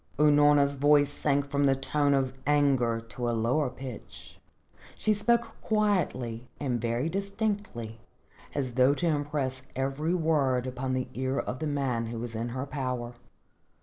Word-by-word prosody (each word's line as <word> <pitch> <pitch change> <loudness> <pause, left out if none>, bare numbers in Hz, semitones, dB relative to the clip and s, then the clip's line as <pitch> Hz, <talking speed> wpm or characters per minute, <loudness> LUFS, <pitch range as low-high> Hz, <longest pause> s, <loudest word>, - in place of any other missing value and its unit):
Unorna's 145 -1 +5
voice 145 0 +4
sank 145 -1 0
from 140 0 +2
the 135 -1 +4
tone 140 +1 +1
of 130 -1 0
anger 135 -6 +3
to 120 +1 -4
a 115 - 0
lower 125 +5 +1
pitch. 125 -2 -10 0.6
She 215 - +1
spoke 235 +3 +1
quietly 155 - 0
and 125 -5 -1
very 120 +5 0
distinctly 195 - -3 0.6
as 130 -4 -2
though 130 +3 +4
to 175 - -2
impress 145 -4 -1
every 135 +6 -1
word 145 -7 +1
upon 130 0 -3
the 130 -1 -1
ear 130 +1 -2
of 130 - -3
the 155 - -2
man 130 -5 -1
who 115 +1 -5
was 115 0 -5
in 115 +2 -3
her 130 +3 -4
power. 125 -4 -3
135 Hz, 150 wpm, -28 LUFS, 125-150 Hz, 0.6 s, Unorna's